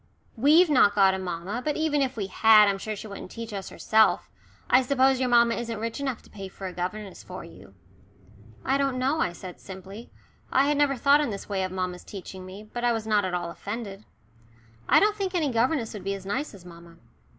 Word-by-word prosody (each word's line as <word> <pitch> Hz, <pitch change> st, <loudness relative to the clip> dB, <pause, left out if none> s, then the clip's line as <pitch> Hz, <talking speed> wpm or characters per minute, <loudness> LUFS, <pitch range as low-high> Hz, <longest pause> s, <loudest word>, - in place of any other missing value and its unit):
"We've 300 Hz, +9 st, +5 dB
not 205 Hz, -7 st, +5 dB
got 195 Hz, -2 st, +5 dB
a 190 Hz, -, -3 dB
mamma, 185 Hz, +5 st, -4 dB
but 300 Hz, +1 st, -1 dB
even 310 Hz, -2 st, +1 dB
if 265 Hz, -2 st, -1 dB
we 205 Hz, -, -2 dB
had 215 Hz, +2 st, +6 dB
I'm 195 Hz, -1 st, 0 dB
sure 215 Hz, +2 st, -4 dB
she 205 Hz, -, -9 dB
wouldn't 200 Hz, -3 st, -8 dB
teach 230 Hz, 0 st, -8 dB
us 195 Hz, -1 st, -5 dB
herself. 220 Hz, 0 st, +2 dB, 0.4 s
I 255 Hz, -, +5 dB
suppose 265 Hz, 0 st, +2 dB
your 255 Hz, -1 st, 0 dB
mamma 235 Hz, -1 st, +5 dB
isn't 230 Hz, -1 st, -4 dB
rich 230 Hz, +4 st, -4 dB
enough 265 Hz, -4 st, -3 dB
to -, -, -19 dB
pay 195 Hz, -2 st, -7 dB
for 190 Hz, +1 st, -10 dB
a 185 Hz, -, -5 dB
governess 185 Hz, +2 st, -5 dB
for 185 Hz, +1 st, -9 dB
you." 100 Hz, -12 st, -15 dB, 0.9 s
"I 270 Hz, +1 st, +1 dB
don't 275 Hz, -2 st, 0 dB
know," 270 Hz, +5 st, 0 dB
I 180 Hz, -, +1 dB
said 180 Hz, +1 st, -10 dB
simply. 195 Hz, +4 st, -10 dB, 0.4 s
I 270 Hz, -, +4 dB
had 295 Hz, -, +2 dB
never 285 Hz, -1 st, +2 dB
thought 280 Hz, +4 st, +4 dB
in 295 Hz, -, -1 dB
this 200 Hz, -2 st, -6 dB
way 195 Hz, -2 st, -2 dB
of 185 Hz, 0 st, -2 dB
mamma's 185 Hz, -1 st, -4 dB
teaching 190 Hz, -1 st, -9 dB
me, 195 Hz, +3 st, -10 dB
but 240 Hz, +3 st, -7 dB
I 240 Hz, -, +3 dB
was 225 Hz, -1 st, -3 dB
not 210 Hz, -2 st, +2 dB
at 180 Hz, -1 st, -2 dB
all 175 Hz, -1 st, -3 dB
offended. 205 Hz, +1 st, -7 dB, 0.9 s
"I -, -, +7 dB
don't 420 Hz, 0 st, +2 dB
think 385 Hz, -3 st, -3 dB
any 305 Hz, -6 st, +1 dB
governess 240 Hz, +1 st, 0 dB
would 205 Hz, -4 st, -8 dB
be 195 Hz, +1 st, -2 dB
as 190 Hz, -1 st, -10 dB
nice 235 Hz, +5 st, -3 dB
as 180 Hz, -3 st, -15 dB
mamma." 170 Hz, -1 st, -14 dB
215 Hz, 230 wpm, -26 LUFS, 190-260 Hz, 0.9 s, I